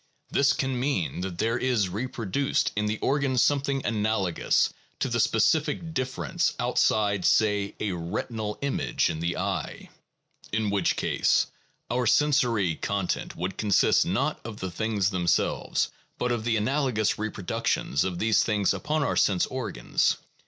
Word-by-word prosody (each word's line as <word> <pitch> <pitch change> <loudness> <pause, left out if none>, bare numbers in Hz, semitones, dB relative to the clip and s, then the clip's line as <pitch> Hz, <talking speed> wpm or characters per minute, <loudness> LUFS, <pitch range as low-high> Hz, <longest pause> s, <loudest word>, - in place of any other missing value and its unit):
This 140 0 +4
can 135 -3 -1
mean 125 - -1
that 90 -2 -4
there 115 +5 0
is 120 -6 +1
reproduced 115 +5 -1
in 105 0 0
the 105 +1 -1
organ 140 -2 +1
something 140 +1 +2
analogous 105 -4 +1 0.2
to - - -1
the 120 0 0
specific 155 +9 +1
difference 130 - -1
outside, 105 -3 +1
say, 105 -1 +2
a 105 - -1
retinal 105 +5 -4
image 140 - 0
in 80 - -5
the 85 +1 -2
eye, - - -4 0.6
1 110 - +1
in 105 - 0
which 100 -1 +1
case - - +2 0.5
our 125 -1 +1
sensory 120 - +3
content 100 +2 -2
would 90 +2 -4
consist 105 -3 +4
not - - -1
of 110 -2 -7
the 95 -1 -4
things 105 +1 0
themselves, 85 -3 0 0.3
but 125 - -1
of 115 -2 -2
the 115 -1 +2
analogous 120 -2 0
reproductions 110 -6 -1
of 90 -2 -3
these 110 +2 +3
things 105 -3 +1
upon 155 0 -1
our - - 0
sense 95 -3 +3
organs. 125 - -1
110 Hz, 145 wpm, -26 LUFS, 100-130 Hz, 0.6 s, This